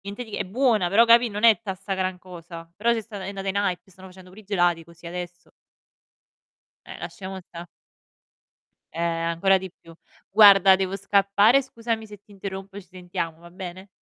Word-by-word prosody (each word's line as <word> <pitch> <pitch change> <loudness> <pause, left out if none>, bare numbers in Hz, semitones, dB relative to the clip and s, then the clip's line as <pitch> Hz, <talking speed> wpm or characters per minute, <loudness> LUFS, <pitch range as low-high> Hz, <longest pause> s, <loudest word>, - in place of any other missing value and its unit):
niente 200 +5 -7
di 220 -3 -10
è - - -2
buona, 220 -3 +1
però 210 +6 +5
capì 235 +1 +5
non 210 +1 -4
è 230 -1 +8
tutta 195 -2 -6
'sta 195 +2 -7
gran 185 -1 -2
cosa. 170 -2 -11
Però 230 +5 0
c'è 225 - -3
stata 205 -3 -9
è 190 - -5
andata 195 -1 -6
in 195 - -2
hype, 190 -1 -2
stanno 185 +1 -14
facendo 185 0 -15
pure 200 +4 -14
i - - -19
gelati 175 -4 +1
così 170 0 -16
adesso. 175 0 -8 1.4
Eh, - - -9
lasciamo 190 -2 -7
stà. 170 -1 -11 1.3
Eh, 165 - -6
ancora 170 +3 +1
di 190 -1 -8
più. 165 -1 -18 0.4
Guarda, 195 -2 +7
devo 190 0 -2
scappare, 200 +5 +3
scusami 230 -3 -4
se 210 -1 -12
ti 210 - -28
interrompo, 195 0 -8
ci 190 - -19
sentiamo, 175 -3 -6
va 170 - -14
bene? 185 +1 -9
190 Hz, 190 wpm, -24 LUFS, 180-205 Hz, 1.4 s, è